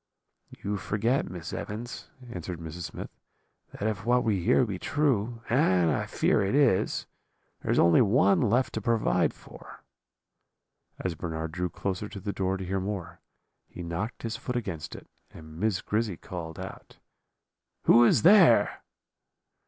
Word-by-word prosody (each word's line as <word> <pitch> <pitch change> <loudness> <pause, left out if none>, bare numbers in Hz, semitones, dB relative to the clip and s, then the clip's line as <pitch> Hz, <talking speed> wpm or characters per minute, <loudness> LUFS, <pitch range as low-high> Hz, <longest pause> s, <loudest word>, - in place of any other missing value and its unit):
"'You 100 +1 -1
forget, 115 +7 0
Miss 90 -1 -7
Evans,' 115 +4 -6 0.2
answered 90 -2 -6
Mrs. 80 +1 -6
Smith, - - -8 0.6
'that 105 - -4
if 105 -3 -2
what 125 +2 +3
we 100 -6 0
hear 125 - +4
be 100 -5 -5
true 120 -5 0
and 95 - +3
I - - -1
fear - - +2
it 100 +5 0
is 135 -10 +2 0.6
there - - -2
is - - +2
only 85 +4 +6
one 125 - +4
left 125 +2 +2
to 110 - -3
provide 115 +1 +2
for.' - - -14 1.1
"As 90 - -3
Bernard 80 -1 -4
drew 90 +2 -2
closer 100 +3 -4
to 100 - -8
the 100 +1 -4
door 95 0 -1
to 95 - -6
hear 95 +2 -1
more, 90 -3 -5 0.5
he 90 - -9
knocked 85 +7 -4
his 115 -1 -3
foot 125 - -5
against 95 -10 -4
it, - - -11 0.2
and 80 0 -12
Miss 105 -2 0
Grizzy 105 -4 -1
called 80 -3 -7
out: - - -9 0.9
"'Who 120 +1 +7
is 120 - +4
there?' 170 - +6
100 Hz, 155 wpm, -28 LUFS, 90-115 Hz, 1.1 s, Who